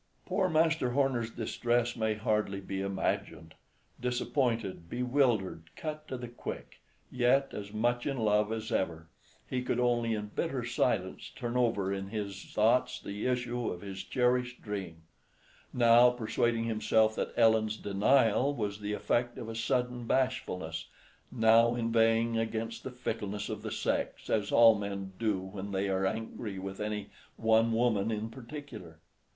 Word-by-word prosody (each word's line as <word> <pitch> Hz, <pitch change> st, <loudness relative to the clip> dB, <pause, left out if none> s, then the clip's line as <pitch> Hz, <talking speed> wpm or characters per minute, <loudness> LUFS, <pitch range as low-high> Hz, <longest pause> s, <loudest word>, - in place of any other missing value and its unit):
Poor 185 Hz, 0 st, +1 dB
Master 160 Hz, -4 st, +2 dB
Horner's 130 Hz, -4 st, +1 dB
distress 120 Hz, +1 st, 0 dB
may 110 Hz, -1 st, 0 dB
hardly 105 Hz, -2 st, 0 dB
be 95 Hz, 0 st, -4 dB
imagined. 95 Hz, -4 st, -2 dB, 0.5 s
Disappointed, 120 Hz, -, -1 dB
bewildered, 120 Hz, -, 0 dB
cut 155 Hz, -1 st, -5 dB
to 130 Hz, -, -4 dB
the 125 Hz, 0 st, -6 dB
quick, 120 Hz, -, -8 dB, 0.3 s
yet 130 Hz, +2 st, +2 dB
as 100 Hz, -1 st, -6 dB
much 120 Hz, +4 st, 0 dB
in 140 Hz, -2 st, -1 dB
love 105 Hz, -1 st, +2 dB
as 110 Hz, 0 st, -4 dB
ever, 80 Hz, -3 st, -1 dB, 0.4 s
he 125 Hz, -, -2 dB
could 125 Hz, -1 st, -1 dB
only 120 Hz, -2 st, +2 dB
in 105 Hz, -1 st, -5 dB
bitter 135 Hz, -8 st, -1 dB
silence 120 Hz, -6 st, -1 dB
turn 120 Hz, -2 st, -5 dB
over 115 Hz, -6 st, +1 dB
in 95 Hz, 0 st, -4 dB
his 100 Hz, -2 st, -5 dB
thoughts 115 Hz, +4 st, +2 dB
the 100 Hz, +4 st, -4 dB
issue 125 Hz, -1 st, -1 dB
of 90 Hz, -, -5 dB
his 95 Hz, -1 st, -6 dB
cherished 125 Hz, +3 st, 0 dB
dream; 95 Hz, -6 st, -5 dB, 0.7 s
now 120 Hz, 0 st, +6 dB
persuading 120 Hz, -1 st, 0 dB
himself 110 Hz, -1 st, +2 dB
that -, -, -2 dB
Ellen's 110 Hz, -2 st, +4 dB
denial 115 Hz, +6 st, +3 dB
was 105 Hz, -3 st, -3 dB
the 105 Hz, 0 st, -3 dB
effect 120 Hz, +3 st, 0 dB
of 115 Hz, -, -6 dB
a 115 Hz, -, -5 dB
sudden 125 Hz, +1 st, -1 dB
bashfulness, 90 Hz, -12 st, -1 dB, 0.4 s
now 115 Hz, 0 st, +5 dB
inveighing 115 Hz, 0 st, +2 dB
against 115 Hz, 0 st, -3 dB
the -, -, -4 dB
fickleness 105 Hz, -5 st, -4 dB
of -, -, -4 dB
the -, -, -4 dB
sex, -, -, -2 dB
as 105 Hz, -2 st, +1 dB
all 115 Hz, -1 st, +8 dB
men 100 Hz, -2 st, -4 dB
do 110 Hz, -4 st, +1 dB
when 95 Hz, +1 st, -7 dB
they 95 Hz, 0 st, 0 dB
are 95 Hz, 0 st, +1 dB
angry 110 Hz, -1 st, -4 dB
with 95 Hz, +1 st, -6 dB
any 105 Hz, 0 st, -3 dB, 0.3 s
one 115 Hz, +1 st, +3 dB
woman 115 Hz, -3 st, +2 dB
in 110 Hz, 0 st, -3 dB
particular. 115 Hz, -, -9 dB
115 Hz, 150 wpm, -31 LUFS, 100-125 Hz, 0.7 s, all